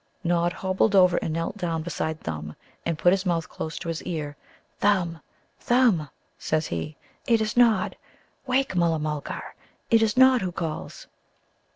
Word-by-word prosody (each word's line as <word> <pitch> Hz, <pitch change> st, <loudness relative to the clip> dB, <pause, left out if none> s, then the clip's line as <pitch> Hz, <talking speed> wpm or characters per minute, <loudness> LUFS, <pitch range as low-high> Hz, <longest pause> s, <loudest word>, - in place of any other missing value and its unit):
Nod 175 Hz, 0 st, +2 dB
hobbled 190 Hz, +3 st, +1 dB
over 180 Hz, -2 st, +6 dB
and -, -, -2 dB
knelt 165 Hz, +5 st, -3 dB
down 165 Hz, -4 st, -2 dB
beside 160 Hz, -1 st, -3 dB
Thumb, 75 Hz, -1 st, -5 dB, 0.3 s
and 165 Hz, -2 st, -1 dB
put 175 Hz, +3 st, +4 dB
his 195 Hz, -1 st, 0 dB
mouth 170 Hz, -4 st, 0 dB
close 160 Hz, -, -6 dB
to -, -, -6 dB
his 165 Hz, -1 st, -3 dB
ear. 150 Hz, -4 st, -4 dB, 0.4 s
"Thumb, 180 Hz, -5 st, +1 dB, 0.4 s
Thumb," 235 Hz, -, +3 dB, 0.3 s
says 155 Hz, 0 st, 0 dB
he, 85 Hz, -, -4 dB, 0.3 s
"it 230 Hz, -2 st, +4 dB
is 215 Hz, -1 st, -1 dB
Nod! 230 Hz, -5 st, +3 dB, 0.5 s
Wake, 260 Hz, -4 st, +1 dB
Mulla 170 Hz, -2 st, +2 dB
mulgar; 150 Hz, -1 st, -4 dB, 0.4 s
it 225 Hz, -1 st, +6 dB
is 220 Hz, +1 st, +1 dB
Nod 260 Hz, -1 st, +6 dB
who 185 Hz, -1 st, -2 dB
calls!" 165 Hz, -2 st, -5 dB
175 Hz, 160 wpm, -25 LUFS, 160-205 Hz, 0.5 s, over